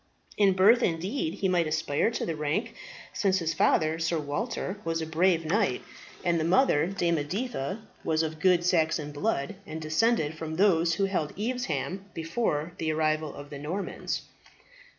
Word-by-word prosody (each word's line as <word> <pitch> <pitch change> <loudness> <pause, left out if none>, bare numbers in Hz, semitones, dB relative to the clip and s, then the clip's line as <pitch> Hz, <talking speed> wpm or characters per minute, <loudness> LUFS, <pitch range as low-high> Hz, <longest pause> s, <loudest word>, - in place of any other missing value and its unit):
In 200 -2 +4
birth 205 +6 +6
indeed 175 - -1
he 195 - 0
might 175 -3 +2
aspire 155 +3 +1
to 230 - -3
the 165 - -2
rank, 150 +8 -1 0.4
since 195 -3 +2
his 165 -2 -1
father, 155 0 +2
Sir 165 0 0
Walter, 190 - -3
was 165 0 -1
a 160 - -2
brave 165 +1 +2
knight, 185 - +1 0.4
and 170 -1 +2
the - - 0
mother, 170 - +3
Dame 175 -4 0
Editha, 195 - -3 0.2
was 160 0 +1
of 160 0 -4
good 180 0 +4
Saxon 160 -4 +1
blood, 145 -1 -1
and 155 +1 -5
descended 160 +1 +1
from 160 -1 -4
those 170 -3 +3
who 200 - +1
held 180 -6 -2
Evesham 195 - -2
before 165 -1 -1
the 160 -1 0
arrival 155 -1 0
of 145 +1 -10
the 140 - -6
Normans." 170 +8 -3
165 Hz, 165 wpm, -28 LUFS, 155-195 Hz, 0.4 s, birth